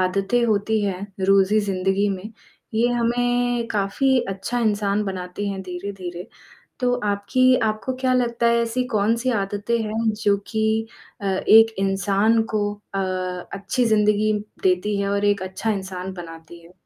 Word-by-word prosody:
आदतें 195 +6 +1
होती 215 0 +1
हैं 190 -2 -2 0.3
रोज़ 195 0 +4
ही 215 - +5
ज़िंदगी 195 0 0
में, 200 +3 -5 0.4
ये 235 +2 +3
हमें 245 0 +1
काफ़ी 220 +6 +1
अच्छा 195 +5 -3
इंसान 210 -2 +1
बनाती 190 +1 -4
हैं 195 -1 -4
धीरे-धीरे। 180 -1 -6 0.5
तो 250 -1 +2
आपकी 255 +6 +3
आपको 215 +4 -3
क्या 260 -1 +2
लगता 235 -1 +1
है 235 0 +4
ऐसी 235 +2 -1
कौन-सी 230 +5 +1
आदतें 205 +4 -1
हैं 220 +1 0
जो 205 -1 +3
कि 220 0 0 0.3
अ, - - -8
एक 220 +4 +5
इंसान 195 +3 +2
को 205 -1 0 0.2
अ, 195 - 0 0.5
अच्छी 200 +5 -1
ज़िंदगी 215 -1 +3 0.3
देती 190 +3 +1
है 200 - -1
और 200 0 0
एक 205 -2 +2
अच्छा 190 +4 -3
इंसान 190 -2 -4
बनाती 170 -1 -10
है? 170 - -17
205 Hz, 150 wpm, -22 LUFS, 195-230 Hz, 0.5 s, ही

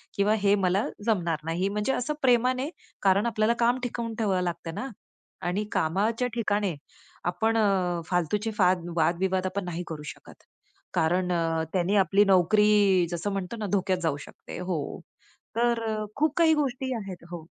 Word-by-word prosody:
किंवा 200 +1 +3
हे 200 0 +5
मला 190 +1 +1 0.2
जमणार 175 -8 +1
नाही. 175 +4 0
म्हणजे 210 +6 -1
असं 265 +5 -1
प्रेमाने, 255 +2 +2 0.3
कारण 195 +2 +4
आपल्याला 220 0 +2
काम 240 +2 +3
टिकवून 235 -2 -3
ठेवावं 195 -4 +1
लागतं 170 -2 -4
ना. 265 - -4 0.5
आणि 190 +4 -1
कामाच्या 210 +9 +1
ठिकाणी 205 -5 0 0.5
आपण 220 +6 +1 0.5
फालतूचे 185 +6 0 0.5
वाद-विवाद 185 +3 +1 0.2
नाही 175 0 -4
करू 155 -2 -6
शकत, - - -17 0.5
कारण 180 +3 +1
अ, 165 -1 0
त्याने 185 +2 +1
आपली 200 +2 +4
नोकरी, 195 0 +4
जसं 175 +4 -2
म्हणतो 195 +3 -4
ना, 215 - -3
धोक्यात 190 -1 +1
जाऊ 160 -3 +1
शकते - - -10
हो, 180 -5 -3 0.6
तर 230 -2 +1
खूप 305 0 +2
काही 325 -2 +5
गोष्टी 265 -3 -1
आहेत 195 -5 -7
हो. 165 -2 -7
200 Hz, 145 wpm, -27 LUFS, 180-225 Hz, 0.6 s, हे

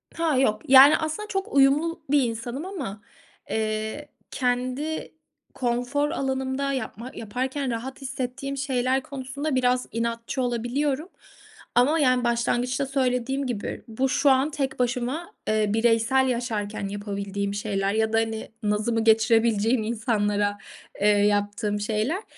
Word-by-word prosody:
Ha, 325 -5 +1
yok. 215 -5 +2
Yani, 270 +2 +9
aslında, 315 +7 -3
çok 390 -2 -3
uyumlu 285 +5 +3
bir 285 -1 +4
insanım 240 +5 -4
ama, 275 - -6 0.5
eee, 220 +6 -2 0.2
kendi 255 +5 -2 0.4
konfor 250 +4 0
alanımda 265 -1 -1
yapma 255 -2 -5
yaparken 255 +4 -3
rahat 255 +4 -5
hissettiğim 270 +1 -4
şeyler 260 -1 0
konusunda 280 +2 -4
biraz 250 0 +2
inatçı 230 +3 -2
olabiliyorum 265 +6 -1 0.7
ama, 285 +7 +4
yani, 255 -3 +3
başlangıçta 240 +3 0
söylediğim 265 0 0
gibi 235 -5 -4
bu 255 +4 -1
şu 280 +2 +3
an 265 +3 +3
tek 275 -4 -3
başıma, 250 +6 -1
eee, 215 0 +2
bireysel 235 +3 +3
yaşarken 220 -5 -2
yapabildiğim 200 0 -3
şeyler 200 -1 -1
ya 220 0 +1
da, - - +4
hani, 225 -1 -2
nazımı 215 +2 0
geçirebileceğim 225 0 +3
insanlara, 205 -2 0 0.4
eee, 205 - +4
yaptığım 205 0 +2
şeyler. 220 - -1
245 Hz, 125 wpm, -25 LUFS, 220-270 Hz, 0.7 s, Yani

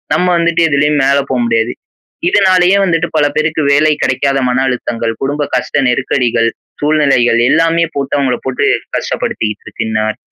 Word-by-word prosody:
நம்ம 180 - +1
வந்துட்டு 170 0 +1
எதுலயும் 145 +1 +1
மேல 140 +1 +3
போமுடியாது. 115 -2 0 0.6
இதுனாலயே 185 0 +3
வந்துட்டு 165 -2 0
பல 150 - +3
பேருக்கு 155 +1 0
வேலை 155 +2 +3
கிடைக்காத 135 +2 0
மன 125 +1 0
அழுத்தங்கள், 115 -2 -2
குடும்ப 145 +2 -1
கஷ்ட 125 +3 -1
நெருக்கடிகள், 120 -2 0 0.3
சூழ்நிலைகள் 140 -6 +2
எல்லாமே 165 +1 +2
போட்டு 140 -1 -2
அவுங்கள 130 -3 0
போட்டு 130 - -1 0.3
கஷ்டப்படுத்திக்கிட்டு 105 -1 -3
இருக்குன்னு 110 0 -3
நான். 110 0 -2
140 Hz, 140 wpm, -13 LUFS, 120-155 Hz, 0.6 s, மேல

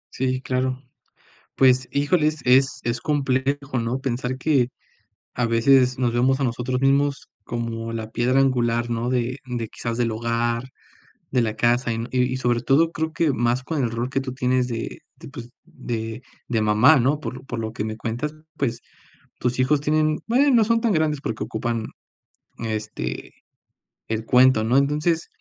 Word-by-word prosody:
Sí, 130 0 -1
claro, 130 0 -1 0.8
pues 130 -1 +4
híjole, 150 +2 +2
es 155 -1 -2
es 130 +2 +4
es 120 0 -2
complejo, 135 -1 0
¿no?, 115 +3 -1
pensar 130 0 -2
que 130 -3 +2 0.6
a 120 -1 0
veces 125 +2 +4
nos 120 -2 +1
vemos 130 +3 +2
a - - +1
nosotros 125 +1 -1
mismos 140 +1 +2 0.2
como 115 -1 -4
la 110 -1 -5
piedra 125 +4 +2
angular, 120 -3 +1
¿no?, 115 +1 -1
de 125 +1 -1
de 120 -3 -4
quizás 115 -1 -4
del 120 -1 0
hogar, 115 +1 -1 0.7
de 125 - +2
la 110 -2 -1
casa 120 +2 +2
y 115 +1 -2
y 125 0 +1
sobre 120 -2 +1
todo 155 +6 +3
creo 160 -1 -3
que 160 -4 +1
más 120 +2 0
con 150 +1 -2
el 115 - 0
rol 120 +3 -3
que 135 - 0
tú 130 -1 -5
tienes 125 -1 +1
de 115 -2 -5 0.2
de - - -12
pues 120 -4 -9
de 115 0 -5 0.3
de 115 -3 +1
mamá, 110 +9 +5
¿no?, 135 +4 +2
por 130 -4 -6
por - - -4
lo 110 0 -4
que 105 - -3
me 110 0 -4
cuentas, 125 +7 -4 0.2
pues, 120 -4 -2 0.6
tus 125 +1 -1
hijos 140 +3 +3
tienen, 155 +1 +1
bueno, 265 +5 +3
no 235 -4 +5
son 230 +1 +2
tan 230 - +1
grandes 155 -5 +1
porque 110 -4 -3
ocupan 115 0 -3 0.7
este 110 - -4 0.7
el 110 0 -3
cuento, 125 -2 +5
¿no?, 120 +4 +2
entonces 150 +4 +1
125 Hz, 170 wpm, -23 LUFS, 115-135 Hz, 0.8 s, mamá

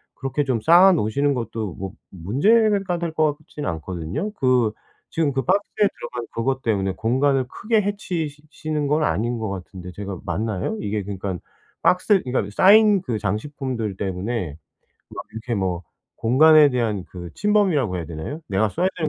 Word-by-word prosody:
그렇게 135 +2 -2
좀 130 -4 0
쌓아 175 - +7
놓으시는 140 +1 +1
것도 115 -5 -4
뭐 95 0 -6 0.2
문제가 195 - +2
될 170 -2 -3
거 155 -2 +2
같지는 150 -1 -6
않거든요. 85 - -4
그 125 - +2 0.4
지금 160 -3 0
그 135 0 -1
박스에 205 +2 +1
들어간 120 -1 -6
그것 130 +3 -1
때문에 95 -4 0
공간을 130 +4 +1
크게 215 - 0
해치시 175 -8 -3
시는 150 -1 -3
건 150 +2 +2
아닌 120 - 0
거 110 -2 -3
같은데 90 -1 -7
제가 100 -1 -6
맞나요? 110 -1 -2
이게 105 0 -2
그러니깐 95 -2 -4 0.4
박스 185 +2 +3
그러니까 125 -6 -1
쌓인 210 0 +6
그 115 -8 -2
장식품들 115 -1 -3
때문에 95 -4 -3 0.5
막 - - -7
이렇게 115 +2 -4
뭐 95 -4 -1 0.3
공간에 150 +5 +6
대한 110 -7 -1
그 90 -2 -9
침범이라고 190 - +2
해야 85 -2 -4
되나요? 85 - -6
'내가 100 +3 +1
써야 180 - +1
되는 160 -3 -1
125 Hz, 350 characters per minute, -22 LUFS, 100-155 Hz, 0.5 s, 쌓아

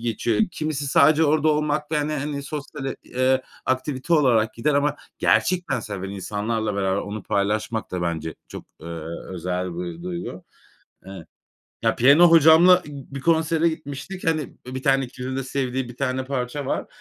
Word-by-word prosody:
geçiyor. 115 -1 0
Kimisi 155 -3 -3
sadece 155 +3 +5
orada 155 +1 +3
olmakta, 150 0 0
hani, 150 +1 -2
hani, 145 0 -3
sosyal 145 -1 -6
et 135 - -3
eee, 130 +1 +1 0.2
aktivite 130 +4 -1
olarak 120 -7 +3
gider 140 +6 0
ama 145 +1 +1 0.2
gerçekten 175 -9 +2
seven 100 -3 -6
insanlarla 105 +2 -2
beraber 95 0 0
onu 105 0 -6
paylaşmak 110 +2 -1
da 90 -1 -3
bence 80 -2 -3
çok, - - -9 0.2
eee, - - -10 0.5
özel 90 - -3
bir 175 -1 -5
duygu. 175 - -6 0.6
Iıı, 95 -4 -9 0.6
ya 115 -1 +2
piyano 145 +8 +7
hocamla 165 +3 +7
i 150 - -9 0.2
bir 140 - -4
konsere 165 +1 +2
gitmiştik. 160 +4 -6
Hani, 160 -2 +2 0.3
i, 130 - -7
bir 130 - -4
tane 135 0 +3
ikilinin 130 +1 -6
de 135 - -1
sevdiği 130 -1 -2
bir 120 - -12
tane 130 -1 -1
parça 130 +1 -3
var. - - -2
135 Hz, 160 wpm, -23 LUFS, 110-155 Hz, 0.6 s, piyano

